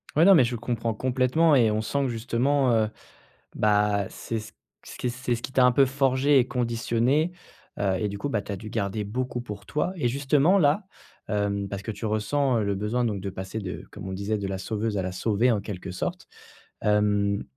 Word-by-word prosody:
Ouais 155 - +5
non, 195 +2 +8
mais 135 -9 +6
je 120 - -2
comprends 115 -1 -2
complètement 130 +7 +2
et 115 -5 +4
on 105 0 0
sent 140 +6 -1
que - - +1
justement, 125 +3 +1
heu, 110 -1 +2 0.7
bah, 105 -1 +2
c'est 115 - -4
c 110 -1 -10 0.3
c - - -10
qu'est 125 - -1
ce 120 -1 -2
qui - - -6
t'a 130 -1 +4
un 125 - +6
peu 135 +3 +5
forgée 135 +1 +2
et 125 -1 +3
conditionnée, 120 +6 +1 0.5
heu, 95 -2 +1
et 105 - 0
du 100 0 -5
coup, 145 - -2
bah, 105 -6 -1
t'as 100 0 -4
dû 110 +3 -8
garder 100 +1 -2
beaucoup 125 +4 -3
pour 105 -4 -8
toi, 150 - -1
et 150 -9 0
justement 140 +8 +3
là, 155 +5 +3 0.4
hem, 100 -1 -1
parce 100 0 -5
que 105 - -8
tu 110 +1 -5
ressens, 120 +5 +1
heu, - - 0
le 100 -1 0
besoin 105 +5 -1
donc 105 -4 -1
de 95 +1 -5
passer 95 +3 -6
de- 95 -4 -5
comme - - -8
on 95 - -4
disait, 100 +3 -2
de 100 -1 -3
la 95 0 -3
sauveuse 110 +2 -2
à - - +1
la 95 0 -3
sauvée, 110 +6 +1
en 110 - +1
quelque 100 -2 -7
sorte- 90 +1 -4 0.5
hem, 105 -1 +2
115 Hz, 220 wpm, -26 LUFS, 100-130 Hz, 0.7 s, non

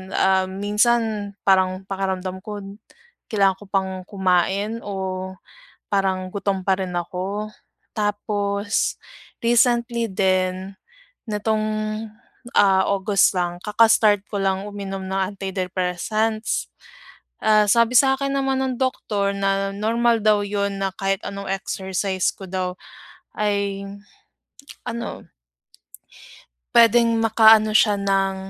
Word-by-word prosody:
ah, 190 0 +3
minsan 210 +1 0
parang 190 -1 +2
pakiramdam 190 -1 -3
ko 210 -2 -6 0.7
kailangan 195 -3 +2
ko 205 - -12
pang 190 -1 0 0.2
kumain 195 +3 0
o 190 -1 -4 0.6
parang 190 -2 0
gutom 195 -1 -1
pa 190 -1 +3
rin 185 -2 -4
ako, 185 +4 -3 0.5
tapos 205 -1 -1 0.4
recently 235 0 +2
din 185 0 0 0.6
nitong, 215 +1 0 1.0
ah, 190 -1 +4
August 200 0 +2
lang 175 0 -2
kaka-start 210 -1 +4
ko 205 - -2
lang 190 0 0
uminom 195 -1 -6
ng 190 +1 -1
antidepressants. 190 - -2 0.7
Ah, 215 -1 +5
sabi 235 +2 +4
sa 270 -1 +4
akin 275 0 -2
naman 270 -1 0
ng 260 -1 -2
doktor 205 -6 -1
na 195 0 0
normal 230 +2 +1
daw 210 -1 +5
yun 200 -1 -2
na 195 0 0
kahit 195 0 -1
anong 200 -1 -6
exercise 190 0 -2
ko 190 - -11
daw 185 -1 -2 0.6
ay, 200 -1 -1 1.0
ano 235 0 -5 1.5
puwedeng 235 0 +6
makaano 220 -1 +6
siya 210 -2 +2
ng 195 -1 +1
200 Hz, 105 wpm, -22 LUFS, 190-215 Hz, 1.5 s, puwedeng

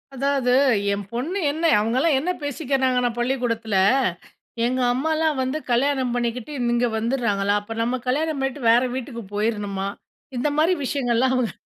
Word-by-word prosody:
அதாவது 270 -2 +1 0.4
என் 200 0 -4
பொண்ணு 305 +12 -2
என்ன 320 +3 -2
அவங்கலாம் 255 +8 +2
என்ன 345 +7 -1
பேசிக்கிறாங்கன்னா 265 -4 0
பள்ளிக்கூடத்துல, 235 -4 -1 0.9
எங்க 255 +2 0
அம்மாலாம் 310 +2 0
வந்து 260 +4 -2
கல்யாணம் 260 0 +1
பண்ணிக்கிட்டு 240 +2 -2 0.2
இங்க 240 +1 +2
வந்துறாங்களா. 220 -4 0
அப்ப 225 +2 -8
நம்ம 240 +2 0
கல்யாணம் 300 +3 0
பண்ணிட்டு 270 +1 -2
வேற 235 +1 +5
வீட்டுக்கு 250 -2 -5
போயிருணுமா? 205 -2 -1 0.5
இந்த 255 +5 +1
மாரி 325 +4 +4
விஷயங்கள்லாம் 255 -1 +1
அவங்க 245 -6 0
250 Hz, 135 wpm, -23 LUFS, 235-280 Hz, 0.9 s, வேற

